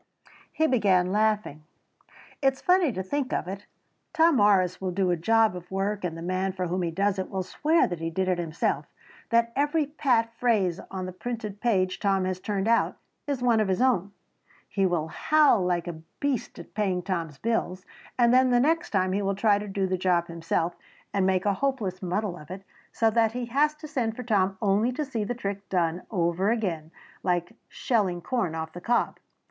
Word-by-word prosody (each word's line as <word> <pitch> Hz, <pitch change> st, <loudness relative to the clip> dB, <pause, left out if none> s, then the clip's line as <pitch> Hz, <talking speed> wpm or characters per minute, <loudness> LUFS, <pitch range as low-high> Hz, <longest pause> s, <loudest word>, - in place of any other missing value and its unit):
He 315 Hz, -, +1 dB
began 195 Hz, -, +3 dB
laughing. 210 Hz, -7 st, 0 dB, 0.8 s
"It 270 Hz, -1 st, +4 dB
is 265 Hz, -, -17 dB
funny 360 Hz, -5 st, +3 dB
to 190 Hz, -3 st, -4 dB
think 265 Hz, +7 st, -2 dB
of -, -, -1 dB
it. 195 Hz, +2 st, -7 dB, 0.5 s
Tom 325 Hz, -3 st, +4 dB
Morris 190 Hz, -4 st, +3 dB
will 190 Hz, -, -1 dB
do 185 Hz, 0 st, +1 dB
a -, -, +2 dB
job 220 Hz, +4 st, +3 dB
of 180 Hz, 0 st, -9 dB
work 195 Hz, +1 st, -2 dB
and 165 Hz, -2 st, -3 dB
the 165 Hz, -, -7 dB
man 185 Hz, +2 st, -1 dB
for 185 Hz, -1 st, -2 dB
whom 180 Hz, +2 st, -1 dB
he 170 Hz, -, 0 dB
does 195 Hz, +3 st, 0 dB
it 185 Hz, -, -3 dB
will 190 Hz, -1 st, -2 dB
swear 315 Hz, -, +2 dB
that 175 Hz, -3 st, -4 dB
he 165 Hz, 0 st, -2 dB
did 185 Hz, +3 st, -1 dB
it 180 Hz, -1 st, +1 dB
himself, 165 Hz, -1 st, -1 dB, 0.4 s
that 235 Hz, 0 st, +2 dB
every 295 Hz, +2 st, +1 dB
pat 250 Hz, -6 st, +1 dB
phrase 200 Hz, -8 st, +2 dB
on 185 Hz, -1 st, -4 dB
the 185 Hz, -, -5 dB
printed 215 Hz, 0 st, -6 dB
page 185 Hz, -6 st, +1 dB
Tom 195 Hz, -2 st, +1 dB
has 185 Hz, 0 st, -2 dB
turned 200 Hz, +1 st, -2 dB
out, 230 Hz, 0 st, +2 dB, 0.3 s
is 275 Hz, -3 st, -2 dB
one 235 Hz, -3 st, +4 dB
of 215 Hz, -, +2 dB
his 190 Hz, +1 st, 0 dB
own. 225 Hz, -7 st, +2 dB, 0.6 s
He 195 Hz, -2 st, +1 dB
will 165 Hz, -3 st, -1 dB
howl 300 Hz, -, +3 dB
like 175 Hz, -1 st, 0 dB
a 160 Hz, -2 st, -6 dB, 0.2 s
beast 280 Hz, -4 st, -2 dB
at -, -, -11 dB
paying 190 Hz, -4 st, 0 dB
Tom's 170 Hz, -6 st, -3 dB
bill, 225 Hz, -4 st, -1 dB, 0.4 s
and 240 Hz, -1 st, +4 dB
then 255 Hz, 0 st, +5 dB
the 245 Hz, -1 st, +4 dB
next 330 Hz, +6 st, +1 dB
time 185 Hz, -2 st, +1 dB
he 200 Hz, -, 0 dB
will 195 Hz, 0 st, 0 dB
try 205 Hz, 0 st, +3 dB
to 210 Hz, -, -6 dB
do 195 Hz, -1 st, -1 dB
the 185 Hz, -1 st, -1 dB
job 175 Hz, -2 st, +2 dB
himself 170 Hz, 0 st, -2 dB, 0.4 s
and 195 Hz, -1 st, +2 dB
make 190 Hz, 0 st, +1 dB
a 205 Hz, -, +3 dB
hopeless 220 Hz, -6 st, -2 dB
muddle 185 Hz, 0 st, -2 dB
of 150 Hz, +1 st, -13 dB
it 190 Hz, +1 st, -7 dB, 0.3 s
so 225 Hz, -1 st, +2 dB
that 225 Hz, 0 st, +2 dB
he 245 Hz, 0 st, -3 dB
has 290 Hz, +5 st, +2 dB
to 310 Hz, 0 st, -10 dB
send 245 Hz, -7 st, -2 dB
for 250 Hz, -, -6 dB
Tom 195 Hz, -4 st, +1 dB
only 210 Hz, +4 st, +2 dB
to 300 Hz, +4 st, -2 dB
see 235 Hz, -6 st, -3 dB
the 245 Hz, +4 st, -3 dB
trick 200 Hz, -3 st, -5 dB
done 175 Hz, -1 st, 0 dB
over 180 Hz, 0 st, +1 dB
again 180 Hz, -9 st, -1 dB, 0.3 s
like 175 Hz, -2 st, -1 dB, 0.2 s
shelling 200 Hz, -8 st, 0 dB
corn 185 Hz, -4 st, -2 dB
off 160 Hz, 0 st, -5 dB
the 175 Hz, -, -8 dB
cob. 240 Hz, +6 st, 0 dB
195 Hz, 205 wpm, -26 LUFS, 180-235 Hz, 0.8 s, then